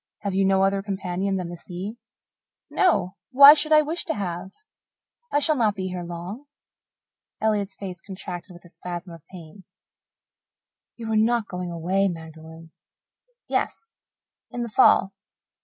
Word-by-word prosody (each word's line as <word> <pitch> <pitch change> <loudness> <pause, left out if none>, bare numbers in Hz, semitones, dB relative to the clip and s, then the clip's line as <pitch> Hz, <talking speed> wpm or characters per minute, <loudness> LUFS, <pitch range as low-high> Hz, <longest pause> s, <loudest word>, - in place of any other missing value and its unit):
Have 200 -2 -3
you 195 +1 +2
no 190 0 +3
other 195 0 +1
companion 195 -1 -2
than 180 -2 -3
the 175 - -6
sea?" 190 +7 -7 0.7
"No. 195 - +1
Why 280 +2 +10
should 310 0 0
I 305 0 +7
wish 320 +4 -3
to 330 - -2
have? 180 -2 -4 0.8
I - - +2
shall 305 +1 +3
not 220 -6 +1
be 185 -1 -4
here 180 -1 -5
long." 175 +9 -7 0.9
Elliott's 205 -3 0
face 185 -3 -7
contracted 185 -1 -7
with 175 0 -15
a - - -15
spasm 175 0 -7
of 165 -3 -13
pain. 180 +1 -13 1.3
"You 225 -2 -6
are - - +1
not 225 0 +2
going 180 -1 -5
away, 180 +4 0
Magdalen?" 160 -1 -9 0.8
"Yes 455 - -2 0.6
in 240 - -4
the 235 - -5
fall. 210 -4 +4
195 Hz, 150 wpm, -24 LUFS, 175-220 Hz, 1.3 s, Why